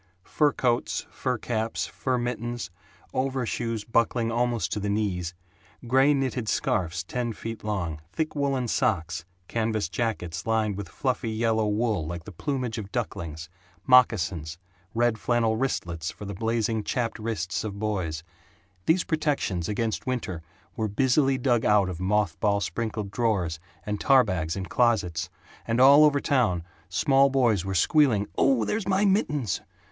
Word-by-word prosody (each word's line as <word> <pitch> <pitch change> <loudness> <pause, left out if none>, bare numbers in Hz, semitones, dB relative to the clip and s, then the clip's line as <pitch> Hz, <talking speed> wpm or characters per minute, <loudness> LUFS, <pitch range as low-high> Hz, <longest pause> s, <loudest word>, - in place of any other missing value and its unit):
Fur 150 +7 +2
coats, 120 -3 0
fur 125 -2 -2
caps, 110 0 -2
fur 130 -1 -2
mittens, 120 -4 -3 0.4
overshoes 125 -4 -1
buckling 115 0 +1
almost 120 -1 0
to - - -1
the 100 0 -2
knees, 90 -4 -1 0.5
gray 135 +4 +4
knitted 130 -5 0
scarfs 85 -2 0
ten 120 +4 -3
feet 115 0 -7
long, 85 -8 -2
thick 160 -1 -2
woolen 135 -3 0
socks, 85 -6 0 0.2
canvas 110 -6 -1
jackets 90 -5 -3
lined 110 -2 +1
with 100 -3 -6
fluffy 125 +1 -1
yellow 110 -1 +1
wool 105 -3 0
like 85 0 -5
the 105 - -9
plumage 125 - -3
of 100 -2 -7
ducklings, 80 -1 -4 0.4
moccasins, 90 - +3 0.4
red 120 -1 +2
flannel 115 -2 +1
wristlets 85 -10 -2
for 105 - -8
the 100 - -5
blazing 110 +1 0
chapped 115 -1 -2
wrists 100 -5 -2
of 100 -2 -5
boys 95 -7 -2 0.6
these 170 +2 +4
protections 140 - -1
against 110 +3 -2
winter 115 -10 -2 0.3
were 110 - -1
busily 130 +5 +2
dug 120 -3 +2
out 105 -3 +4
of 90 -2 -5
moth 95 -3 0
ball 100 0 +2
sprinkled 110 -1 -3
drawers 100 -8 0 0.3
and 105 -1 -3
tar 135 -2 +6
bags 90 -7 -2
in 95 -1 -3
closets, 90 -8 +1 0.4
and 115 +1 +1
all 140 +3 +8
over 145 -2 +4
town 115 -13 +1 0.3
small 135 +9 +4
boys 120 -9 +2
were 95 0 -3
squealing, 120 - +3
"Oh, 130 -5 +3
there's 210 - -2
my 195 +1 +3
mittens!" 150 - +1
110 Hz, 150 wpm, -26 LUFS, 95-125 Hz, 0.6 s, all